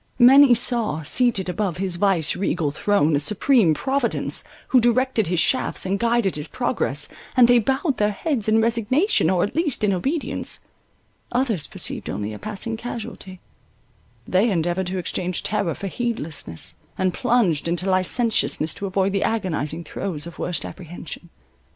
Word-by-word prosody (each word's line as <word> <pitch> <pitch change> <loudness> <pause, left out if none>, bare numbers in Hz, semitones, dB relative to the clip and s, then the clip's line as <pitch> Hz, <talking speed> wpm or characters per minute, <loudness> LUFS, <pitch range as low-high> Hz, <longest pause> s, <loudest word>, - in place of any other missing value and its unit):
Many 260 +1 +8
saw, 225 -9 0
seated 210 - +2
above 180 -2 -2
his 185 -2 -2
vice 180 -5 +2
regal 175 -5 -1
throne, 160 -2 +2
a - - +2
supreme 210 - +3
Providence, 265 - 0 0.3
who 255 - +5
directed 240 -2 +2
his 175 0 0
shafts, 260 - +1
and 195 +1 -1
guided 235 -6 +1
his 150 +1 -5
progress, 240 - -1 0.3
and 245 -2 +8
they 245 0 +6
bowed 265 - 0
their 210 0 +2
heads 230 +1 -1
in 220 +1 +4
resignation, 235 - +2
or 185 -2 +2
at 205 - -3
least 310 -8 0
in 200 -2 +3
obedience. 275 - -2 0.7
Others 240 - 0
perceived - - -2
only 105 +1 -4
a 105 - -8
passing 215 +2 -4
casualty; 220 -5 -7 0.9
they 195 +6 +3
endeavoured 175 0 0
to 185 +1 -3
exchange 180 0 -2
terror 200 -5 -1
for - - -7
heedlessness, 185 - -5 0.2
and 185 -1 +1
plunged 230 - +1
into 175 +3 -1
licentiousness, 185 -3 +1
to 200 - -5
avoid 190 0 0
the 200 - 0
agonizing 170 -7 -1
throes 165 -4 -5
of 170 - -10
worst 180 - -2
apprehension. 175 -1 -9
200 Hz, 155 wpm, -22 LUFS, 175-240 Hz, 0.9 s, Many